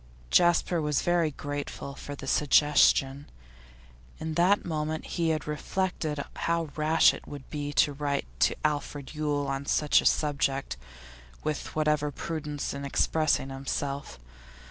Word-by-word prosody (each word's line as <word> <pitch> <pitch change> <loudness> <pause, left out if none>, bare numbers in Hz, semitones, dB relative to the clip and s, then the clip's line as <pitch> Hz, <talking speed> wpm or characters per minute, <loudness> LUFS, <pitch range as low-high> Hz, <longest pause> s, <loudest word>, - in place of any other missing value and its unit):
Jasper 175 -1 +3
was 150 -1 0
very 175 -2 +2
grateful 145 -1 -5
for 145 +1 -8
the - - -9
suggestion. 145 -1 +3 0.9
In 160 0 -4
that 180 +5 +3
moment 155 -2 -2
he 170 -2 -1
had 155 -3 -1
reflected 155 0 -2 0.2
how 165 -2 -1
rash 155 +1 +4
it - - -10
would 140 -2 -9
be 145 -1 -3
to 145 +2 +3
write 140 0 -2
to - - +3
Alfred 145 -1 -2
Yule 150 -2 -1
on 135 +1 -3
such 150 -1 +3
a - - -8
subject, 140 -2 0 0.7
with 155 -1 -3
whatever 150 -1 +1
prudence 150 -1 -4
in 140 0 -6
expressing 145 0 +1
himself. 140 - -4
150 Hz, 135 wpm, -28 LUFS, 140-155 Hz, 0.9 s, rash